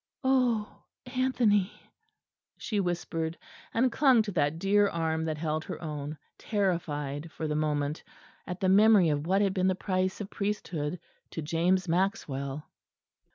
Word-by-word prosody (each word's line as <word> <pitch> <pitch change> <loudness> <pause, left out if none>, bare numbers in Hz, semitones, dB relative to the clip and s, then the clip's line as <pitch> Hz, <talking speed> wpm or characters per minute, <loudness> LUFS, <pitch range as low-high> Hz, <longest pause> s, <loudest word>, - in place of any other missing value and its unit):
"Oh, 250 -5 +1 0.2
Anthony," 245 -6 +2 0.9
she 210 -3 -2
whispered, 170 -3 -2 0.3
and 250 +2 +2
clung 255 -3 +5
to 210 - -4
that 155 -3 +1
dear 205 +3 +3
arm 160 -1 -1
that 155 -1 -2
held 155 0 -2
her - - -6
own; 150 -1 -5 0.2
terrified 160 -7 -2
for 160 - -4
the 150 - -1
moment 150 0 -1 0.4
at 180 0 -5
the 190 - +2
memory 205 -2 +6
of 150 +1 -1
what 195 +3 +3
had 195 -2 +1
been 185 -1 +1
the 185 - +2
price 185 0 -1
of 205 -1 -6
priesthood 180 -6 -3 0.3
to 160 - -5
James 175 +4 +1
Maxwell. 155 -6 -1
180 Hz, 145 wpm, -29 LUFS, 155-205 Hz, 0.9 s, memory